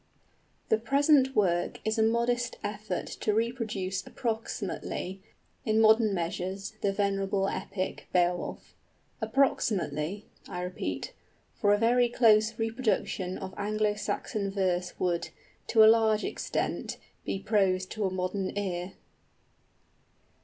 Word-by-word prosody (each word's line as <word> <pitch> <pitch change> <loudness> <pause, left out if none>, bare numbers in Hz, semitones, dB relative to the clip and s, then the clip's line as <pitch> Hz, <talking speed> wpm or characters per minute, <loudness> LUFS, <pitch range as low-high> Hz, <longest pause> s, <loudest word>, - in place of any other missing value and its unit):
The 220 - +3
present 275 +2 +3
work 175 -4 +1
is 220 +1 0
a - - +5
modest 235 +2 +1
effort 210 +1 -3
to 210 - -2
reproduce 220 -5 -1
approximately, 210 -5 -4 0.4
in 220 0 +2
modern 220 0 +5
measures, 190 +3 -3
the 200 - +2
venerable 195 -1 0
epic, 190 -1 -4
Beowulf. 175 0 0 0.5
Approximately, 210 - 0 0.2
I 180 - -4
repeat; 180 0 -4 0.4
for 205 - +2
a 205 - +5
very 240 +2 +3
close 220 -2 +4
reproduction 220 -5 -1
of 190 -1 -7
Anglo 210 +1 +1
Saxon 210 -1 -3
verse 185 -2 -1
would, 175 -2 0 0.4
to 220 -2 +6
a - - +9
large 220 -1 +5
extent, - - -2 0.3
be - - -2
prose 195 -2 +1
to 215 +3 -4
a - - +2
modern 185 +2 -2
ear. 185 -2 -3
205 Hz, 115 wpm, -29 LUFS, 185-225 Hz, 0.5 s, a